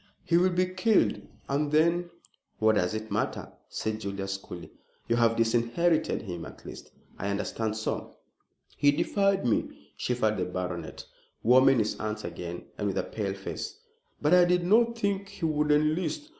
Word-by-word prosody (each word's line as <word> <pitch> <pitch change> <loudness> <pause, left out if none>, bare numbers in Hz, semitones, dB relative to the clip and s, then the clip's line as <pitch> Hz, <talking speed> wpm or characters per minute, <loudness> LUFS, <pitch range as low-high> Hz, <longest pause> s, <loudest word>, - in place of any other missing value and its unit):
"He 170 - +1
will 180 +2 +5
be 180 0 +2
killed, 185 +4 +2 0.3
and 145 +1 0
then 170 +3 +3 0.2
" - - -42
"What 110 0 +4
does 90 0 +1
it 110 0 -5
matter?" - - -2 0.2
said 110 0 -3
Julius 100 -1 -3
coolly 90 -2 -10 0.4
"you 115 - +2
have 115 -1 +3
disinherited 120 +9 +1
him 90 -5 -6
at - - -11
least, - - -10 0.3
I 100 - -2
understand 110 +2 -2
so." 110 - -4 0.6
"He 145 - +5
defied 195 +5 +1
me," 115 - -2
shivered 110 -4 0
the 90 - 0
baronet, 90 -2 -5 0.4
warming 130 +2 +6
his 110 -2 0
hands 110 0 -3
again 85 0 -6 0.2
and 105 - 0
with 100 - -2
a - - +1
pale 100 -3 -3
face; 95 - -6 0.4
"but 150 +3 +2
I 180 -1 +7
did 180 0 +2
not 230 +4 +4
think 200 -2 -1
he 200 -4 -5
would 150 -1 +1
enlist. 155 - +1
125 Hz, 170 wpm, -28 LUFS, 105-175 Hz, 0.6 s, I